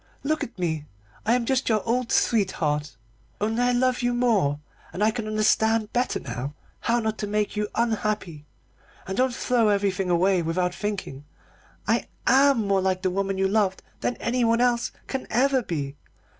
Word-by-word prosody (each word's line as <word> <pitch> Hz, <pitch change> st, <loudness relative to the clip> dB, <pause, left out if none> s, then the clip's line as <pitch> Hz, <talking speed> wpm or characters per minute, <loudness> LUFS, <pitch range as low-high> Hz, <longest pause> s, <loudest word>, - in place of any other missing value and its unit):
Look 310 Hz, +2 st, 0 dB
at -, -, -8 dB
me. 160 Hz, -4 st, -2 dB, 0.4 s
I 230 Hz, -, +5 dB
am 245 Hz, -2 st, 0 dB
just 265 Hz, +1 st, +1 dB
like -, -, 0 dB
your 220 Hz, -1 st, +1 dB
old 245 Hz, +1 st, 0 dB
sweetheart, 150 Hz, -, +1 dB, 0.4 s
only 220 Hz, +3 st, 0 dB
I 245 Hz, 0 st, +3 dB
love 255 Hz, +1 st, +1 dB
you 245 Hz, 0 st, +1 dB
more, 205 Hz, -13 st, +2 dB, 0.3 s
and 185 Hz, +5 st, -2 dB
I 215 Hz, -, +4 dB
can 220 Hz, -1 st, -4 dB
understand 215 Hz, 0 st, +2 dB
better 245 Hz, +1 st, 0 dB
now 130 Hz, +3 st, -5 dB, 0.2 s
how 235 Hz, +1 st, +1 dB
not 220 Hz, -1 st, -2 dB
to 210 Hz, -, -2 dB
make 210 Hz, +1 st, -1 dB
you 210 Hz, 0 st, -1 dB
unhappy. 215 Hz, -9 st, -1 dB, 0.6 s
Ah, 190 Hz, -, -3 dB
don't 255 Hz, +5 st, +2 dB
throw 240 Hz, -4 st, +2 dB
everything 195 Hz, -2 st, +1 dB
away 180 Hz, +1 st, +3 dB
without 180 Hz, +2 st, 0 dB
thinking. 190 Hz, -8 st, -4 dB, 0.6 s
I -, -, +1 dB, 0.2 s
am 270 Hz, -4 st, +4 dB
more 195 Hz, -1 st, +2 dB
like 185 Hz, 0 st, 0 dB
the 185 Hz, -, +1 dB
woman 195 Hz, +1 st, -1 dB
you 190 Hz, 0 st, +2 dB
loved 195 Hz, -2 st, +1 dB, 0.2 s
than 245 Hz, -, -1 dB
anyone 235 Hz, -1 st, +1 dB
else 240 Hz, -1 st, +2 dB
can 265 Hz, -1 st, -4 dB
ever 260 Hz, +3 st, +3 dB
be. 145 Hz, -, -4 dB
210 Hz, 175 wpm, -25 LUFS, 185-240 Hz, 0.6 s, I